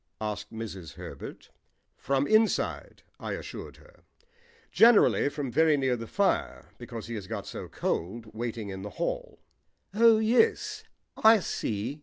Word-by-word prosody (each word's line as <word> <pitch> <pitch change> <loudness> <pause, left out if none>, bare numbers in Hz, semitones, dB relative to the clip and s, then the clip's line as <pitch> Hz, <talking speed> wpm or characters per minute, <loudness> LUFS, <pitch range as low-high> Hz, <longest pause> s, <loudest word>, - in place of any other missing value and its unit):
asked 105 -1 -4
Mrs. 95 -7 -7
Herbert. - - -9 0.4
"From 135 0 0
inside," 215 +5 +1 0.2
I - - -4
assured - - -7
her. - - -21 0.7
"Generally 230 -10 +5
from 145 -3 -4
very 155 +2 +4
near 130 -2 +1
the 115 -1 -7
fire, 65 - -1
because 115 -2 -7
he 115 - -6
has 105 -4 -6
got - - -5
so - - -7
cold 110 +7 -3
waiting 115 -2 -4
in 95 -1 -6
the 105 - -6
hall." - - -3 0.6
"Oh, 225 +1 +6
yes, 425 - +2 0.3
I 220 0 +7
see." 115 - -3
130 Hz, 140 wpm, -28 LUFS, -, 0.7 s, I